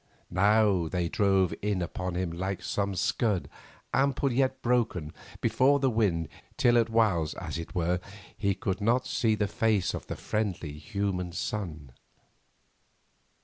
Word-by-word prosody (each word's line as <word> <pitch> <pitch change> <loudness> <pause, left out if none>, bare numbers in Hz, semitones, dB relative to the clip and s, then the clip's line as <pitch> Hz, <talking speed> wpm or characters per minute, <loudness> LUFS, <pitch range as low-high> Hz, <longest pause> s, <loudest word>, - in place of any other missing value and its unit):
Now 100 -2 +3
they 90 +1 -1
drove 95 -2 +2
in 105 -2 0
upon 90 +1 -4
him 90 -1 -1
like 95 +2 -3
some 100 +1 -1
scud, 95 +1 0 0.5
ample 140 0 +2
yet 130 +1 +1
broken, 110 -10 0 0.3
before 140 +2 +3
the 135 -2 +2
wind, 95 -8 +1 0.3
till 120 0 +5
at 115 -1 +1
whiles, 105 -9 +2
as - - -5
it 85 - -8
were, 90 0 +1 0.4
he 100 -1 0
could 95 +1 -2
not 120 +4 +2
see 110 -2 +1
the 105 -1 0
face 105 -2 +1
of - - -6
the - - -4
friendly, 95 -8 -2
human 90 +2 -3
sun. 80 -9 -4
100 Hz, 145 wpm, -29 LUFS, 90-115 Hz, 0.5 s, till